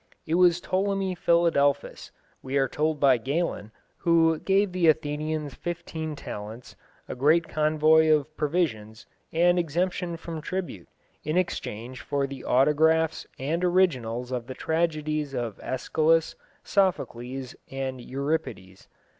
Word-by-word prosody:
It 160 Hz, -, -3 dB
was 175 Hz, 0 st, +5 dB
Ptolemy 195 Hz, 0 st, -1 dB
Philadelphus, 165 Hz, -5 st, +1 dB, 0.3 s
we 135 Hz, +1 st, -2 dB
are 135 Hz, -1 st, +3 dB
told 155 Hz, +3 st, -1 dB
by 135 Hz, -3 st, +5 dB
Galen, 135 Hz, -4 st, -2 dB, 0.3 s
who 165 Hz, -2 st, +3 dB
gave 195 Hz, 0 st, +2 dB
the 180 Hz, -2 st, +1 dB
Athenians 150 Hz, -1 st, 0 dB
fifteen 160 Hz, -2 st, -5 dB
talents, 110 Hz, -1 st, -8 dB, 0.3 s
a -, -, -5 dB
great 155 Hz, +6 st, +3 dB
convoy 155 Hz, +1 st, +3 dB
of 155 Hz, 0 st, +2 dB
provisions, 130 Hz, -9 st, -2 dB, 0.3 s
and 175 Hz, +2 st, +3 dB
exemption 175 Hz, +1 st, -1 dB
from 165 Hz, -1 st, -7 dB
tribute, 175 Hz, -, -5 dB, 0.4 s
in 155 Hz, +3 st, -1 dB
exchange 130 Hz, -8 st, -3 dB
for 140 Hz, -1 st, -1 dB
the 135 Hz, -1 st, -8 dB
autographs 160 Hz, +4 st, +2 dB
and 160 Hz, +7 st, -2 dB
originals 130 Hz, -10 st, +1 dB
of 125 Hz, -2 st, -3 dB
the 130 Hz, -, -7 dB
tragedies 155 Hz, -3 st, -1 dB
of 115 Hz, -4 st, -4 dB
Æschylus, 160 Hz, +5 st, +1 dB, 0.3 s
Sophocles, 135 Hz, -9 st, -1 dB
and 135 Hz, -1 st, -4 dB
Euripides. 130 Hz, -9 st, -4 dB
155 Hz, 120 wpm, -26 LUFS, 135-170 Hz, 0.4 s, was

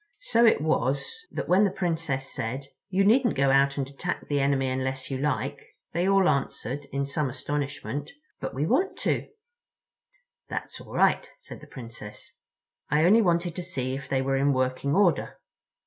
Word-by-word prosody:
So 240 Hz, -, +4 dB
it 220 Hz, -, +4 dB
was 155 Hz, -, -1 dB
that -, -, -4 dB
when 185 Hz, +3 st, +5 dB
the 200 Hz, -, +4 dB
Princess 165 Hz, -7 st, -2 dB
said: 130 Hz, +5 st, -3 dB, 0.2 s
"You 195 Hz, +1 st, +2 dB
needn't 240 Hz, +3 st, +4 dB
go 135 Hz, 0 st, +3 dB
out 140 Hz, +1 st, +4 dB
and 135 Hz, -2 st, -1 dB
attack 140 Hz, +6 st, -4 dB
the 145 Hz, -1 st, +1 dB
enemy 135 Hz, -1 st, +2 dB
unless 130 Hz, +1 st, -2 dB
you 130 Hz, -, -2 dB
like," 140 Hz, -1 st, -1 dB, 0.3 s
they 175 Hz, +3 st, +1 dB
all 195 Hz, -2 st, +5 dB
answered, 140 Hz, 0 st, -1 dB
in 140 Hz, +1 st, -1 dB
some 140 Hz, 0 st, -1 dB
astonishment: 145 Hz, 0 st, -3 dB, 0.3 s
"But -, -, -5 dB
we 140 Hz, +3 st, 0 dB
want 375 Hz, -, +1 dB
to." -, -, 0 dB, 1.2 s
"That's -, -, -5 dB
all -, -, -12 dB
right," -, -, +3 dB
said -, -, -11 dB
the -, -, -12 dB
Princess. 115 Hz, -4 st, -10 dB, 0.5 s
"I 150 Hz, +3 st, +3 dB
only 215 Hz, +6 st, +6 dB
wanted 170 Hz, -3 st, +1 dB
to -, -, -2 dB
see 130 Hz, -8 st, -3 dB
if 140 Hz, +1 st, -6 dB
they 135 Hz, -1 st, +1 dB
were 135 Hz, 0 st, +1 dB
in 140 Hz, +1 st, +3 dB
working 130 Hz, +2 st, 0 dB
order." 190 Hz, -4 st, +2 dB
140 Hz, 175 wpm, -27 LUFS, 135-175 Hz, 1.2 s, only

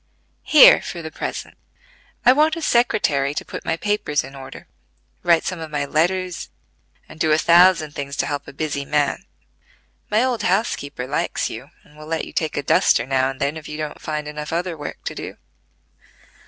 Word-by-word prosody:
"Here 305 Hz, -, +8 dB
for 170 Hz, -2 st, -7 dB
the 160 Hz, -, -6 dB
present. -, -, -6 dB, 0.7 s
I 250 Hz, -, +8 dB
want 310 Hz, +3 st, +3 dB
a 330 Hz, -, -6 dB
secretary 150 Hz, -, +2 dB
to -, -, -3 dB
put -, -, -7 dB
my 165 Hz, -, -1 dB
papers 205 Hz, -8 st, -1 dB
in 135 Hz, -, -11 dB
order, 135 Hz, -1 st, -10 dB, 0.6 s
write 170 Hz, -2 st, +3 dB
some 185 Hz, -2 st, -3 dB
of 160 Hz, -1 st, -6 dB
my 145 Hz, -1 st, -2 dB
letters, 180 Hz, +4 st, -1 dB, 0.6 s
and 155 Hz, -, -14 dB
do 160 Hz, -, +2 dB
a 155 Hz, -, +5 dB
thousand 170 Hz, -2 st, +5 dB
things 140 Hz, -1 st, -6 dB
to -, -, +1 dB
help 145 Hz, -1 st, -4 dB
a -, -, -8 dB
busy 140 Hz, -1 st, -3 dB
man. 150 Hz, +6 st, 0 dB, 0.8 s
My 215 Hz, +3 st, +3 dB
old 255 Hz, -3 st, 0 dB
housekeeper 145 Hz, -, -1 dB
likes 140 Hz, +3 st, -2 dB
you, -, -, -9 dB
and 150 Hz, -, -22 dB
will 155 Hz, 0 st, -12 dB
let 160 Hz, 0 st, -2 dB
you -, -, -12 dB
take 160 Hz, -2 st, -2 dB
a 145 Hz, -, -1 dB
duster -, -, +3 dB
now 130 Hz, 0 st, +1 dB
and 135 Hz, 0 st, -7 dB
then 140 Hz, +3 st, -1 dB
if 160 Hz, -, -9 dB
you 150 Hz, -, -6 dB
don't 155 Hz, -1 st, -5 dB
find 150 Hz, -1 st, -4 dB
enough 150 Hz, 0 st, -6 dB
other 175 Hz, +1 st, -2 dB
work 145 Hz, -2 st, -8 dB
to -, -, -4 dB
do. -, -, -8 dB
155 Hz, 195 wpm, -21 LUFS, 145-180 Hz, 0.8 s, Here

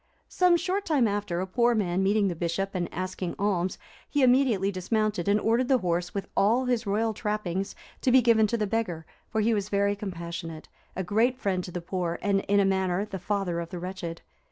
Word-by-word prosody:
Some 360 Hz, -1 st, +4 dB
short 370 Hz, +4 st, -1 dB
time 290 Hz, -, +2 dB
after, 200 Hz, -4 st, -2 dB
a -, -, -1 dB
poor 235 Hz, +5 st, +2 dB
man 185 Hz, -3 st, 0 dB
meeting 200 Hz, +1 st, +3 dB
the 175 Hz, -, -2 dB
Bishop, 175 Hz, +4 st, -2 dB
and 175 Hz, -2 st, -2 dB
asking 185 Hz, -1 st, -4 dB
alms, 190 Hz, -3 st, 0 dB, 0.3 s
he 290 Hz, -2 st, +2 dB
immediately 245 Hz, -6 st, +3 dB
dismounted, 205 Hz, 0 st, -1 dB
and 205 Hz, +1 st, +4 dB
ordered 230 Hz, +4 st, +2 dB
the 265 Hz, -, +4 dB
horse, 175 Hz, -4 st, -1 dB
with 200 Hz, -, -4 dB
all 230 Hz, +6 st, +3 dB
his 245 Hz, -3 st, 0 dB
royal 220 Hz, +3 st, +1 dB
trappings, 195 Hz, -3 st, -3 dB, 0.3 s
to 255 Hz, -, +2 dB
be 260 Hz, -, +7 dB
given 225 Hz, -3 st, +4 dB
to 235 Hz, -, -1 dB
the 215 Hz, -, 0 dB
beggar; 195 Hz, -7 st, -2 dB, 0.2 s
for 220 Hz, -, 0 dB
he 225 Hz, +2 st, +2 dB
was 205 Hz, -1 st, -1 dB
very 200 Hz, 0 st, +1 dB
compassionate, 170 Hz, -4 st, -6 dB, 0.3 s
a 190 Hz, -, -2 dB
great 225 Hz, +7 st, +2 dB
friend 190 Hz, -7 st, -1 dB
to 180 Hz, -, -8 dB
the 175 Hz, -, -4 dB
poor, 170 Hz, -1 st, -2 dB
and, 200 Hz, -1 st, +2 dB
in 205 Hz, 0 st, +4 dB
a 200 Hz, -, +4 dB
manner, 190 Hz, 0 st, +1 dB
the 200 Hz, -3 st, -6 dB
father 180 Hz, -2 st, -1 dB
of 170 Hz, -1 st, -5 dB
the 180 Hz, -, -6 dB
wretched. 175 Hz, -2 st, -6 dB
200 Hz, 210 wpm, -27 LUFS, 180-225 Hz, 0.3 s, be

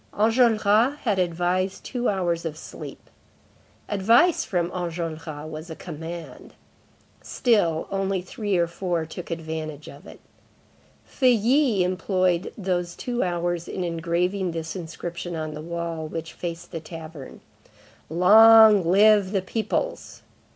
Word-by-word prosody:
Enjolras 225 Hz, +2 st, +3 dB
had 210 Hz, -6 st, 0 dB
advised 180 Hz, +2 st, -1 dB
two 245 Hz, -1 st, -2 dB
hours 175 Hz, -4 st, -1 dB
of 160 Hz, -2 st, -5 dB
sleep. -, -, -10 dB, 0.8 s
Advice 230 Hz, -, +3 dB
from 175 Hz, -3 st, -1 dB
Enjolras 165 Hz, -3 st, -5 dB
was 155 Hz, +2 st, -8 dB
a 160 Hz, -, -6 dB
command. 165 Hz, 0 st, -9 dB, 0.7 s
Still, 175 Hz, -10 st, +1 dB
only 195 Hz, -1 st, -1 dB
three 195 Hz, +2 st, -2 dB
or 170 Hz, -, +3 dB
four 170 Hz, -1 st, -3 dB
took 165 Hz, +2 st, -9 dB
advantage 160 Hz, -2 st, -5 dB
of -, -, -12 dB
it. -, -, -12 dB, 0.9 s
Feuilly 250 Hz, -3 st, +2 dB
employed 185 Hz, -1 st, 0 dB
these 180 Hz, -3 st, -2 dB
two 245 Hz, -1 st, -3 dB
hours 175 Hz, -1 st, -2 dB
in 185 Hz, -, -4 dB
engraving 175 Hz, +2 st, -1 dB
this 160 Hz, -1 st, -5 dB
inscription 170 Hz, 0 st, -6 dB
on 155 Hz, -1 st, -4 dB
the 150 Hz, -, -7 dB
wall 170 Hz, -1 st, -4 dB
which 160 Hz, +1 st, -6 dB
faced 170 Hz, 0 st, -6 dB
the 165 Hz, -, -4 dB
tavern:— 160 Hz, -3 st, -10 dB, 0.7 s
LONG 215 Hz, +4 st, +7 dB
LIVE 200 Hz, +2 st, +4 dB
THE 195 Hz, -3 st, 0 dB
PEOPLES! 225 Hz, -, -3 dB
175 Hz, 125 wpm, -24 LUFS, 165-205 Hz, 0.9 s, LONG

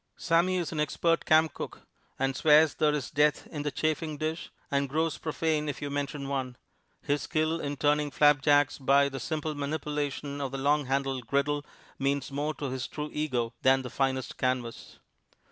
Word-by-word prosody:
Sammy 175 Hz, +2 st, +2 dB
is 175 Hz, -3 st, -2 dB
an 155 Hz, -, -3 dB
expert 165 Hz, +2 st, +1 dB
camp 155 Hz, 0 st, +4 dB
cook, -, -, -7 dB, 0.4 s
and 135 Hz, 0 st, 0 dB
swears 150 Hz, +2 st, +5 dB
there 150 Hz, -1 st, +2 dB
is 140 Hz, -4 st, -4 dB
death 150 Hz, 0 st, +2 dB
in 150 Hz, -, -6 dB
the 145 Hz, -, -1 dB
chafing 155 Hz, +1 st, -2 dB
dish, 155 Hz, +2 st, -3 dB, 0.2 s
and 140 Hz, -1 st, +1 dB
grows 160 Hz, +2 st, 0 dB
profane 155 Hz, -1 st, -1 dB
if 145 Hz, -, -4 dB
you 145 Hz, -1 st, -4 dB
mention 140 Hz, 0 st, -3 dB
one. 130 Hz, -3 st, -3 dB, 0.5 s
His 145 Hz, 0 st, 0 dB
skill 155 Hz, +1 st, 0 dB
in 145 Hz, -1 st, -4 dB
turning 150 Hz, +1 st, +2 dB
flapjacks 145 Hz, 0 st, +4 dB
by 140 Hz, +1 st, +4 dB
a 140 Hz, -1 st, -2 dB
simple 155 Hz, +2 st, -3 dB
manipulation 145 Hz, -1 st, -3 dB
of 135 Hz, -2 st, -3 dB
the -, -, -2 dB
long 145 Hz, +1 st, +1 dB
handled 135 Hz, -2 st, -1 dB
griddle 145 Hz, +2 st, 0 dB, 0.4 s
means 140 Hz, 0 st, -1 dB
more 150 Hz, +2 st, -2 dB
to 140 Hz, -3 st, -4 dB
his 130 Hz, -1 st, -3 dB
true 150 Hz, 0 st, -6 dB
ego 125 Hz, -6 st, -1 dB
than 130 Hz, 0 st, +4 dB
the 125 Hz, -, -7 dB
finest 130 Hz, -1 st, -1 dB
canvas. 125 Hz, -2 st, -2 dB
145 Hz, 180 wpm, -29 LUFS, 135-155 Hz, 0.5 s, swears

